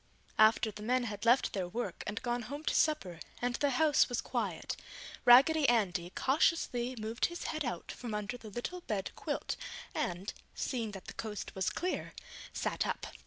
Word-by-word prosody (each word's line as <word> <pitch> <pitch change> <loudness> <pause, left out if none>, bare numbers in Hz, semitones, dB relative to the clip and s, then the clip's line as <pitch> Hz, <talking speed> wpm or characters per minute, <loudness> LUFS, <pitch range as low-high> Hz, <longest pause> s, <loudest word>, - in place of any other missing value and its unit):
After 220 0 +6
the 210 - -10
men 250 +3 +2
had 205 -2 -4
left 245 +3 +5
their 190 -3 -1
work 235 +7 -4
and 210 +1 -3
gone 240 0 0
home 285 +6 -6
to - - +1
supper 195 - +1 0.2
and 245 0 0
the 285 - +2
house 295 +2 +4
was 245 - -1
quiet, - - -2 0.5
Raggedy 275 +4 +8
Andy 185 -7 +2
cautiously 260 -4 +2
moved 220 +2 0
his 345 0 -6
head 310 -1 -2
out 245 - -4
from 235 -4 -5
under 210 +3 -3
the 225 -3 -9
little 240 - -4
bed 205 - -2
quilt - - -2 0.4
and, 180 +3 -2 0.2
seeing 235 -4 -2
that 195 - -8
the - - -7
coast 215 -2 -5
was 190 -1 0
clear, 365 +1 -3 0.4
sat - - -1
up. - - -2
240 Hz, 175 wpm, -33 LUFS, 210-270 Hz, 0.5 s, Raggedy